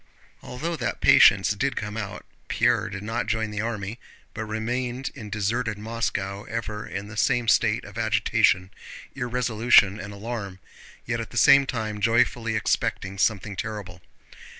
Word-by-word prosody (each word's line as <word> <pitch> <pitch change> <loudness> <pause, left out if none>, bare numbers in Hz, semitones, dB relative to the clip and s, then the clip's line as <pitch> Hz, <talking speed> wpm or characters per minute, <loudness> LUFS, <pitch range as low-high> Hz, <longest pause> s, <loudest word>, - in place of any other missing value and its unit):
Although 160 +7 -4
that - - -3
patience 95 0 +6
did 135 +7 -1
come 105 0 -4
out, 100 -3 -6 0.2
Pierre - - +1
did 100 0 -7
not 115 +3 -2
join 110 -1 -1
the 105 0 -3
army, 110 0 -4 0.3
but 110 - -4
remained 120 +4 -3
in 105 -2 -9
deserted 105 +2 -1
Moscow 105 -3 -3
ever 110 -1 -5
in 100 +1 -5
the 110 - -10
same 120 +2 +1
state 110 -1 +2
of 105 +2 -8
agitation, 100 -4 +2 0.4
irresolution, 120 -5 +3
and 100 +1 -7
alarm, 100 -2 -6 0.5
yet 115 0 -2
at 115 - -5
the 120 - -8
same 140 +1 +6
time 110 -4 -3
joyfully 115 0 +2
expecting 100 -2 -1
something 105 -1 0
terrible. 100 -4 -6
110 Hz, 150 wpm, -25 LUFS, 100-115 Hz, 0.5 s, patience